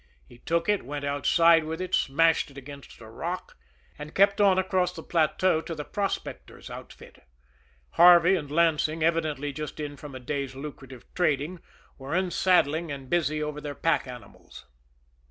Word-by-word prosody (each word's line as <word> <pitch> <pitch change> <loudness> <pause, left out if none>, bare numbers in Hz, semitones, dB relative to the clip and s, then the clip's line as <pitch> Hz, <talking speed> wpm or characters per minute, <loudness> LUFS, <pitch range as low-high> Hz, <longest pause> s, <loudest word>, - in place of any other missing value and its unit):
He 120 - -17
took 165 +5 -1
it, 205 -1 +2
went 145 +2 -5
outside 165 +4 +4
with 160 +2 -5
it, 185 0 -5
smashed 165 +4 +2
it 140 - -16
against 140 +1 -11
a 110 - -11
rock 170 +11 -6 0.4
and 150 +1 -9
kept 200 +1 +4
on 195 -2 +5
across 185 -1 +1
the 160 -3 -10
plateau 165 +1 +1
to 165 +1 -6
the 150 -1 -6
prospectors' 200 -2 -5
outfit. - - -12 0.7
Harvey 175 +1 +7
and 150 -6 -4
Lansing, 155 0 +1
evidently 155 -4 0
just 150 +1 -7
in 145 -1 -5
from 145 -2 -10
a - - -6
day's 135 +1 -4
lucrative 135 -3 -10
trading, 155 0 0 0.4
were 135 +4 -4
unsaddling 175 -4 +1
and 135 -2 -8
busy 155 -3 0
over 150 0 -5
their 145 -1 -6
pack 150 -4 0
animals. 125 -1 -12
155 Hz, 160 wpm, -26 LUFS, 145-175 Hz, 0.7 s, Harvey